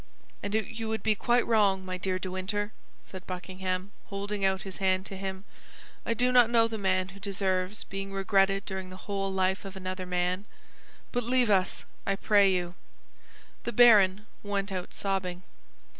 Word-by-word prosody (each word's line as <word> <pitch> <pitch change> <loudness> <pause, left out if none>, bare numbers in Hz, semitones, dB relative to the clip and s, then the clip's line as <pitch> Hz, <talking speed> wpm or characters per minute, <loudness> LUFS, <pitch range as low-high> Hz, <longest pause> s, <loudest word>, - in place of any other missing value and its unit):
"And 205 +1 -3
you 220 +1 -2
would 220 -2 -2
be 220 - +3
quite 240 +3 +2
wrong, 200 -4 +3
my 185 0 -3
dear 185 0 -1
De 185 0 -5
Winter," 205 +3 -3 0.3
said 190 -1 -10
Buckingham, 185 +1 -4 0.2
holding 200 0 -4
out 190 0 +1
his 190 -1 -5
hand 190 -1 +1
to 195 - -4
him. 190 0 -5 0.6
"I 230 - +1
do 250 +2 +2
not 245 -2 +6
know 230 -1 +4
the 225 -1 -5
man 185 -1 +1
who 195 +1 -12
deserves 195 0 -1
being 195 0 -6
regretted 195 0 +2
during 190 -1 -5
the 185 - -9
whole 195 -1 -2
life 190 0 +1
of 195 -1 -8
another 185 -1 -5
man; 180 +2 0 0.7
but 245 - 0
leave 245 -1 +2
us, 185 -2 +1 0.2
I 195 - 0
pray 200 0 +4
you." 175 -1 -1 0.9
The 235 - -3
baron 210 -4 +6 0.2
went 200 -1 -2
out 185 -2 -4
sobbing. 185 -2 -2
195 Hz, 175 wpm, -29 LUFS, 185-210 Hz, 0.9 s, not